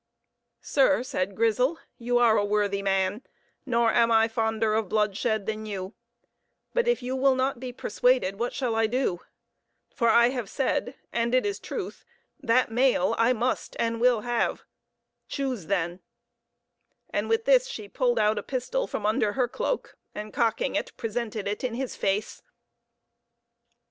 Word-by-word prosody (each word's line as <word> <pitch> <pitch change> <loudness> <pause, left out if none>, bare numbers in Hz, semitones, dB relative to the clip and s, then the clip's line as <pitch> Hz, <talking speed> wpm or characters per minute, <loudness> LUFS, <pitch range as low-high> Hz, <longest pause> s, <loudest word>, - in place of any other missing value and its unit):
"Sir," 275 -2 +3
said 195 -5 -2
Grizel, 230 - +2 0.2
"you 245 +1 +1
are 235 -2 +5
a 205 - +2
worthy 205 -1 0
man; 195 +2 0 0.5
nor 235 -2 +3
am 235 -1 +4
I 225 0 +5
fonder 220 -1 0
of 215 -3 0
bloodshed 215 0 0
than 215 0 -4
you; 195 -1 -5 0.8
but 485 -1 +1
if 485 - +1
you 255 +1 -2
will 265 0 +3
not 260 -1 0
be 255 0 -5
persuaded, 245 -4 +1
what 240 +1 -1
shall 250 -4 -2
I 225 0 +2
do? 230 -7 -1 0.7
For 235 -3 +2
I 235 +1 +6
have 245 -6 -4
said 265 -1 -1 0.2
and 235 +1 +1
it 255 - +3
is 405 -1 -2
truth - - -6 0.4
that 230 +1 +2
mail 245 -6 +2
I 230 +2 +4
must 245 +2 -2
and 230 0 -1
will 245 -3 +4
have. 240 +1 -1 0.6
Choose, 255 - -3
then;" 180 -2 -1 1.1
and - - -1
with 455 0 +1
this - - +5
she 475 -4 -7
pulled - - 0
out 210 0 +2
a - - -4
pistol 280 - -2
from 205 - -4
under 210 -1 +1
her 250 0 +1
cloak, - - -3 0.2
and, 210 0 -6
cocking 230 +3 0
it, - - -3
presented 225 -3 -3
it 205 +4 -3
in 245 -2 -2
his 260 0 -4
face. 200 +2 -1
230 Hz, 160 wpm, -26 LUFS, 210-255 Hz, 1.1 s, I